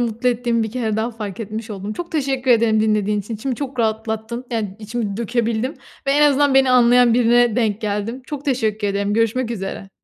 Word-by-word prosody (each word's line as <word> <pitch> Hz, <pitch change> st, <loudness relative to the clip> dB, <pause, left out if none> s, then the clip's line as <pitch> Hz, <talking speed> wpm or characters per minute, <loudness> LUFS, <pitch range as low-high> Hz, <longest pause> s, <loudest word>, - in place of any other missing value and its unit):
mutlu 235 Hz, +1 st, 0 dB
ettiğimi 235 Hz, -1 st, 0 dB
bir 220 Hz, -, -3 dB
kere 225 Hz, -3 st, -2 dB
daha 225 Hz, +2 st, -1 dB
fark 210 Hz, -3 st, -7 dB
etmiş 220 Hz, +1 st, -6 dB
oldum. 200 Hz, +1 st, -5 dB
Çok 345 Hz, +8 st, -7 dB
teşekkür 270 Hz, -4 st, 0 dB
ederim 225 Hz, -2 st, +4 dB
dinlediğiniz 210 Hz, -2 st, +1 dB
için. 225 Hz, -, -5 dB
İçimi 250 Hz, +4 st, -3 dB
çok 270 Hz, 0 st, -6 dB
rahatlattın. 220 Hz, +2 st, -2 dB
Yani 210 Hz, -5 st, -3 dB
içimi 215 Hz, -2 st, -4 dB
dökebildim 235 Hz, +2 st, -1 dB, 0.3 s
ve -, -, +2 dB
en 295 Hz, +1 st, +4 dB
azından 285 Hz, -1 st, +4 dB
beni 265 Hz, -1 st, +5 dB
anlayan 245 Hz, -1 st, +5 dB
birine 240 Hz, -1 st, +3 dB
denk 220 Hz, -3 st, 0 dB
geldim. 215 Hz, +4 st, -3 dB
Çok 290 Hz, -1 st, -6 dB
teşekkür 220 Hz, -6 st, 0 dB
ederim. 200 Hz, +1 st, -1 dB
Görüşmek 230 Hz, +2 st, +1 dB
üzere. 195 Hz, -2 st, -5 dB
230 Hz, 190 wpm, -20 LUFS, 215-250 Hz, 0.3 s, beni